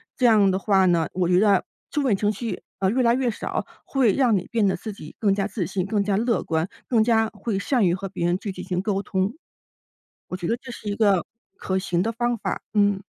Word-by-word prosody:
这 250 - +3
样 210 -4 +5
的 190 - 0
话 195 -2 +3
呢， 170 -3 +2
我 180 -1 0
觉 180 +1 +4
得 200 -2 +4 0.3
负 295 - 0
面 255 -7 +2
情 205 +1 +1
绪， 225 +2 -5 0.2
呃， 190 - +2
越 250 +6 +1
来 235 0 +4
越 255 -1 +1
少， - - -4 0.2
会 260 -6 +2
让 245 -7 +3
你 180 - -4
变 225 -3 +2
得 190 - +1
自 220 - -6
己 155 -7 -11
更 205 -3 +3
加 195 0 0
自 205 -4 -3
信、 185 +2 -2
更 205 0 0
加 200 -1 0
乐 230 +2 +1
观、 160 +1 -1 0.2
更 230 -3 +4
加 225 -1 +2
会 210 0 -3
善 240 -1 +1
于 170 - +2
和 190 +1 -4
别 170 - -3
人 175 +1 +2
去 200 - -5
进 - - -8
行 180 -1 -1
沟 195 0 -1
通。 190 +1 -1 0.9
我 185 - -5
觉 175 -2 -4
得 230 - +1
这 255 +1 -10
是 220 -3 -9
一 205 - -2
个 200 -5 +3 0.3
可 190 - -2
行 175 -2 0
的 225 - -1
方 240 +1 -1
法。 - - -3
嗯。 205 -2 +3
205 Hz, 265 characters per minute, -24 LUFS, 190-225 Hz, 0.9 s, 样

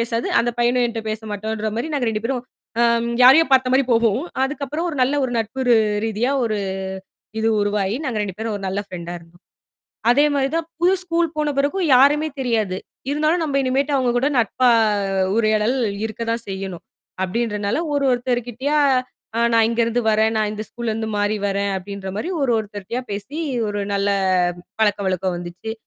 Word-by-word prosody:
பேசாது. 230 0 -1
அந்தப் 240 0 0
பையனும் 240 +1 +3
என்ட்ட 230 -1 -4
பேசமாட்டான்ற 215 0 -3
மாரி 240 - -2
நாங்க 265 -5 0
2 215 -1 -2
பேரும் 250 0 -1 0.4
அம் 235 0 +2
யாரையோ 270 +6 +8
பார்த்த 255 -1 +4
மாரி 265 +1 +5
போவோம். 230 0 +3 0.2
அதுக்கப்புறம் 295 +4 -2
ஒரு 305 - -4
நல்ல 255 +3 +3
ஒரு 250 - -2
நட்பு 225 +4 -3
ரு 240 - +7 0.3
ரீதியா 225 +4 0
ஒரு 215 -2 0 0.8
இது 225 +1 +1
உருவாயி, 205 0 0
நாங்க 240 -5 -2
2 195 -3 -4
பேரும் 220 -1 -3
ஒரு 200 - -8
நல்ல 195 +2 -1
ஃப்ரெண்டா 175 -2 -7
இருந்தோம். 170 +2 -20 0.7
அதே 285 +5 +5
மாதிரி 275 -1 +1
தான் 330 -1 -1
புது 360 +2 +4
ஸ்கூல் 340 -1 +1
போன 300 -1 +1
பிறகும் 310 +6 +1
யாருமே 295 +4 +5
தெரியாது. 220 -7 0 0.3
"இருந்தாலும் 310 +4 +1
நம்ப 285 -3 -2
இனிமேட்டு 270 +2 0
அவங்க 255 -2 +2
கூட 270 +4 +2
நட்பா 245 +2 +3 0.7
உரையாடல் 215 +2 +2 0.3
இருக்கதான் 230 +1 -3
செய்யணும்." 190 -2 -5 0.4
அப்படீன்றனால 210 - -1
ஒரு 280 -1 +1
ஒருத்தர் 245 0 0
கிட்டயா, 275 +6 -1 0.6
"அ - - +2
நான் 225 -1 +5
இங்கருந்து 235 +1 0
வரேன். 220 +1 +2
நான் 210 -1 0
இந்த 215 0 -5
ஸ்கூல்லருந்து 225 -2 -3
மாறி 205 +1 +1
வரேன்." 200 0 -1
அப்படீன்ற 195 0 -6
மாரி 345 - -3
ஒரு 255 -3 +2
ஒருத்தர்ட்டயா 210 +3 -5
பேசி 205 +10 -5 0.3
ஒரு 205 0 -2
நல்ல 200 0 0 0.7
பழக்க 205 -2 +3
வழக்கம் 185 -1 -1
வந்துச்சு. 175 +6 -6
230 Hz, 165 wpm, -21 LUFS, 210-265 Hz, 0.8 s, யாரையோ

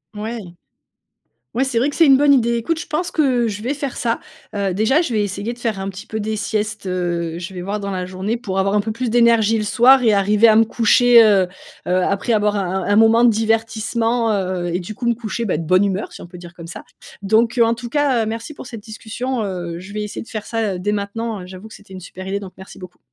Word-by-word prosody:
Mouais. 220 +3 -4 1.2
Ouais, 255 +3 +1
c'est 265 -3 -1
vrai 255 +5 +2
que - - -9
c'est 330 - +5
une 270 -1 +7
bonne 290 0 +5
idée. 235 -2 +2
Écoute, 310 +8 -1
je 350 - -6
pense 315 +3 -2
que 255 -6 +1
je 210 -1 -5
vais 265 +4 -1
faire 280 -2 -5
ça. 230 -1 -1 0.3
Heu, 200 -2 -1
déjà, 220 - +2
je 295 - -3
vais 210 -2 +1
essayer 205 +3 -4
de - - -21
faire 225 -5 -2
un 190 - -3
petit 195 +3 -8
peu 220 - -4
des 215 +1 -2
siestes, 215 0 -3
heu. 175 -2 -2
Je 180 +2 -7
vais 180 - -6
voir 200 +3 -3
dans 200 0 -4
la 185 -1 -3
journée 190 +5 -3
pour 200 -6 -4
avoir 195 +1 0
un - - +4
peu 220 +2 -3
plus 240 +1 -3
d'énergie 230 -2 +4
le 215 - -2
soir 245 +5 +5
et 220 - +4
arriver 205 +2 +4
à 220 - +6
me 225 - +6
coucher, 235 +1 +5
heu 195 -4 +4 0.4
heu, 185 +1 +2
après 200 +4 -1
avoir 210 -1 +1
un 190 -1 -2
un 205 - +1
moment 225 +2 +5
de 240 - +7
divertissement, 225 +1 0
heu, 185 -3 -2
et 175 - 0
du 185 +4 -7
coup, 240 - -5
me 235 - +3
coucher, 230 0 -4
bah, 190 - 0
de 165 - -4
bonne 185 +4 +4
humeur, 195 0 -2
si - - -11
on - - -9
peut 180 - -12
dire 175 0 -12
comme 170 -2 -10
ça. - - -9 0.4
Donc, 225 +4 +2
heu, 235 - +6
en 230 0 +2
tout 240 +1 -8
cas, 275 -3 +1
heu, - - -6
merci 225 +6 -5
pour - - -10
cette 230 -4 -9
discussion. 230 +3 -4
Heu, 175 -4 -4
je 190 +2 -11
vais 210 - -2
essayer 210 - -6
de - - -14
faire 215 -2 -6
ça, 225 -4 -1
heu, - - -5
dès 205 +3 -1
maintenant. 210 0 -4
J'avoue 185 +3 -11
que - - -13
c'était 205 -2 -14
une 185 - -8
super 185 +1 -9
idée, 200 +1 -1
donc 190 -2 -9
merci 190 0 -12
beaucoup. 180 -1 -12
215 Hz, 265 wpm, -19 LUFS, 195-235 Hz, 1.2 s, une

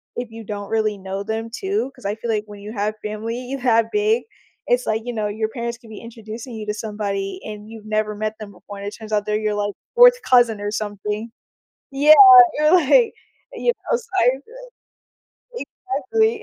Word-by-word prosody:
if 245 -2 -5
you 225 0 -9
don't 205 -1 -6
really 215 -2 0
know 195 +1 -5
them 225 +1 -4
too 385 - -2
'cause - - -16
I 200 - 0
feel 230 +1 -6
like 210 -1 0
when 205 -1 -12
you 210 +2 -8
have 210 -1 -2
family 230 +5 -4
that 230 -2 +3
big, 430 +2 +1 0.4
it's 245 +1 +2
like, 220 +1 0
you 245 - -4
know, 215 -2 -2
your 215 +1 -2
parents 235 -1 -5
can 230 -3 -17
be 215 - -9
introducing 230 +1 -9
you 215 -1 -6
to 210 - -1
somebody, 200 -3 -4
and 210 0 -8
you've 220 -1 -11
never 215 0 -1
met 215 +1 -3
them 210 -2 -8
before, 200 +2 -12
and 200 - -7
it - - -4
turns 220 -1 -11
out 210 -1 0
they're 210 - -1
your 215 -1 -1
like, 205 -1 -2 0.2
4th - - +7
cousin 240 - +3
or 205 - -2
something. 210 +1 -4 0.6
Yeah, 290 +3 +6 0.4
you're 305 +2 +3
like 405 - +4 0.4
you 480 - +1 0.2
know, - - +4
so 475 -1 -10
I've 250 +2 +4
been - - -15 0.7
exactly. 445 +2 -1
220 Hz, 200 wpm, -21 LUFS, 210-255 Hz, 0.7 s, 4th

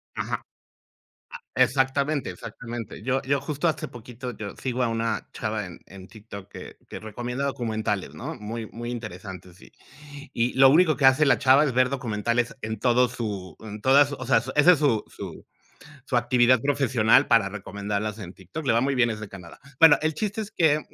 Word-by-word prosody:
Ajá. - - -3 0.9
Ah, - - -8 0.2
exactamente, 135 +3 +1
exactamente. 115 -3 -8
Yo 130 +3 0
yo 140 +1 0
justo 145 +3 -3
hace 155 0 -2
poquito 125 0 -9
yo 100 -2 -7
sigo 130 -1 -2
a 120 - +2
una 115 -1 -2
chava 110 -2 -3
en 90 - -11
en 95 0 -12
TikTok 100 -3 -11
que - - -11
que - - -8
recomienda 120 +5 -4
documentales, 110 -7 -2
¿no? - - -6
Muy, 110 +2 -6
muy 120 +1 -6
interesantes 95 -5 -8
y - - -17 0.6
y 120 +1 0
lo 135 0 +7
único 160 0 +4
que 135 - +3
hace 130 +3 +5
la 140 - +4
chava 135 +3 +5
es 140 - 0
ver 125 +1 +3
documentales 120 -1 -1
en 110 0 -4
todo 125 +1 +3
su 100 -8 -5
en 105 -1 -8
todas 140 +3 +5
o 130 -2 -6
sea, 135 - +4 0.2
ese 150 +5 +7
es 165 - +2
su 135 -8 +1
su - - -9 0.6
su 130 - 0
actividad 120 0 +4
profesional 130 -5 +3
para 115 -4 +4
recomendarlas 105 +1 -4
en 95 -3 -8
TikTok, 95 - -8
le 130 - +3
va 115 - +3
muy 135 +1 0
bien, 120 -2 +3
es 110 -1 -5
de 110 - -7
Canadá. 90 -4 -12 0.2
Bueno, 150 -4 +8
el 155 0 0
chiste 205 +6 -3
es 210 -1 -6
que 155 -5 +2
120 Hz, 190 wpm, -25 LUFS, 110-135 Hz, 0.9 s, Bueno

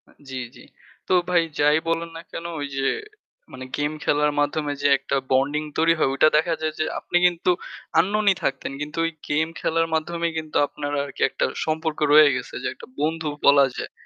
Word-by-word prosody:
আ - - -20 0.2
জি, 135 - -6 0.2
জি। - - -14 0.5
তো - - +1 0.2
ভাই 175 -1 +4 0.2
যাই 150 +1 +5
বলুন 165 0 -1
না - - -7
কেন 170 - -6 0.3
যে 135 0 -1 0.9
গেম 145 0 0
খেলার 150 0 +2
মাধ্যমে 145 0 0
যে 145 - +3
একটা 140 +1 -3 0.2
বন্ডিং 140 +3 +2
তৈরি 165 +1 +4
হয় 135 - +3
ওইটা 135 +3 +5
দেখা 165 +2 +1
যায় 155 0 -1
যে 155 - +1
আপনি 175 - 0
কিন্তু 175 0 +2 0.5
আননউন 205 +5 +1
ই - - -17
থাকতেন। 135 -1 -2
কিন্তু 150 +2 -6
ওই 165 - -1 0.2
গেম 155 +2 +1
খেলার 165 0 +1
মাধ্যমেই 170 +1 -1
কিন্তু 155 -1 -3
আপনার 145 0 -5 0.4
একটা - - -1 0.2
সম্পর্ক 160 0 -2
রয়ে 150 0 +8
গেছে 125 - -6
যে - - -1
একটা - - -13
বন্ধু 160 +2 -1 0.2
বলা 140 -1 +7
যায়। - - -5
155 Hz, 185 wpm, -23 LUFS, 145-165 Hz, 0.9 s, রয়ে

